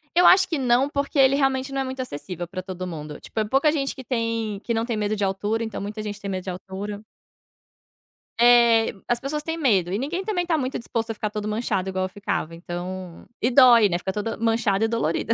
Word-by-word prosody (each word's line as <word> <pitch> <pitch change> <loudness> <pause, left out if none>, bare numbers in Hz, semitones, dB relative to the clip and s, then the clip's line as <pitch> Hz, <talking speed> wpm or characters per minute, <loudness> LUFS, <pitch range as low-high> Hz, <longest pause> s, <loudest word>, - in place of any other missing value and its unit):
Eu 355 +1 +5
acho 370 0 +7
que 325 -5 -1
não, 255 +1 +2
porque 280 0 -1
ele 270 0 +6
realmente 270 -1 0
não 275 - -1
é - - 0
muito 260 0 -4
acessível 175 - -6
pra 185 +1 -5
todo 185 -1 -6
mundo, 150 -3 -7
tipo, 220 -1 -3
pouca 275 +6 +3
gente 275 -3 -2
que 260 - -9
tem 230 -4 -2
que 235 - -2
não 225 0 0
tem 235 -3 -2
medo 210 0 0
de 205 - -2
altura, 205 +4 -1
então, 220 -3 -5
muita 210 +2 -5
gente 210 -1 -5
tem 200 - -5
medo 185 -1 -3
de 190 - -5
altura. 195 +3 -6 1.4
É, 235 -1 +5
as 240 - +1
pessoas 295 +3 -3
têm 325 +1 -3
medo 200 - +2
e 200 - -1
ninguém 335 +9 -3
também, 380 -4 -1
tá 335 -2 +1
muito 260 -2 -2
disposto 230 -1 -3
a - - -3
ficar 215 0 -3
todo 210 0 -4
manchado 210 -3 -1
igual 185 0 -1
eu - - -5
ficava, 185 -4 -3
então 175 +1 -7 0.2
E 240 - +2
dói, 240 -5 +7
né, 175 - 0
fica 190 +2 -4
toda, 210 +2 -3
manchada 225 -2 +1
e - - +1
dolorida. 225 -2 0
225 Hz, 230 wpm, -24 LUFS, 195-260 Hz, 1.4 s, acho